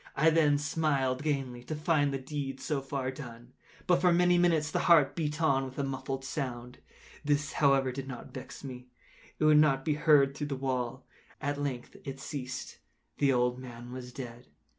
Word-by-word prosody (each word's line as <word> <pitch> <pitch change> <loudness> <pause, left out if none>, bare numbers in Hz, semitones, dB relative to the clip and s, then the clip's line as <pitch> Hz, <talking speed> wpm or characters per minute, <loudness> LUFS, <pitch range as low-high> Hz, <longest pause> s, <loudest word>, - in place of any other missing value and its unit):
I 160 +3 +4
then 150 -3 +4
smiled 145 -4 0
gaily, 135 -5 -2
to 155 - -4
find 150 -2 +2
the 135 - -1
deed 135 -1 -5
so 140 +1 -2
far 135 -1 -3
done. 120 -3 -10 0.3
But, 180 -1 +3
for 180 0 +5
many 180 +1 +4
minutes, 165 -4 +2
the - - 0
heart 145 -5 +6
beat 150 -2 -2
on 140 -5 +3
with 130 -1 -8
a 140 - 0
muffled 135 0 -4
sound. 125 -3 -5 0.4
This, 145 -1 +1
however, 135 -2 +3
did 135 +1 -6
not 130 -1 -8
vex 130 +1 -9
me; 125 -2 -8 0.5
it - - -2
would 155 -1 +7
not 135 -3 +3
be 155 - +2
heard 145 -2 +4
through 145 +1 -3
the 140 - -2
wall. 130 -1 -2 0.3
At 145 0 -2
length 130 -4 -4
it 135 0 -6
ceased. 130 -3 -6 0.4
The 140 -1 +4
old 125 0 +1
man 120 -1 -9
was 125 -1 -7
dead. 120 -2 -8
135 Hz, 185 wpm, -30 LUFS, 130-150 Hz, 0.5 s, would